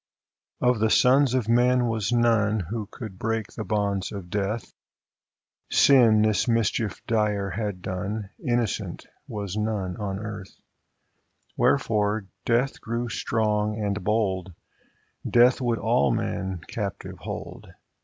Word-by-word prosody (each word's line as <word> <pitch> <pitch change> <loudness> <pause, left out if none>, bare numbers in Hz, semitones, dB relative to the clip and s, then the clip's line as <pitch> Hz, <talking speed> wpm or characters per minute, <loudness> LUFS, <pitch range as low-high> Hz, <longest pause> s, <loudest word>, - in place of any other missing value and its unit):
Of 125 -2 +3
the 110 +1 +2
sons 130 +2 +4
of 125 -4 0
men 120 +1 +3
was 110 -2 -1
none 115 -3 +3
Who 110 -3 -3
could 105 -4 -9
break 115 -2 -2
the 110 - -5
bonds 100 -3 -1
of 95 -4 -8
Death; 105 +3 -2 1.0
Sin 115 -6 +6
this 105 -3 +2
mischief 115 -2 0
dire 105 -3 0
had 100 -1 -4
done; 100 +2 -4
Innocent 120 -3 -1 0.2
was 100 -3 -5
none 105 -4 -2
on 100 -2 -3
earth: 105 -2 -8 1.0
Wherefore 105 -5 +1 0.2
Death 125 +4 +1
grew 120 +1 -3
strong 105 -1 0
and 100 -3 -2
bold; 95 -4 0 0.7
Death 125 +2 +5
would 120 -2 +1
all - - +2
men 95 -2 -2
captive 100 -4 -5
hold. - - -7
110 Hz, 125 wpm, -25 LUFS, 100-115 Hz, 1.0 s, Sin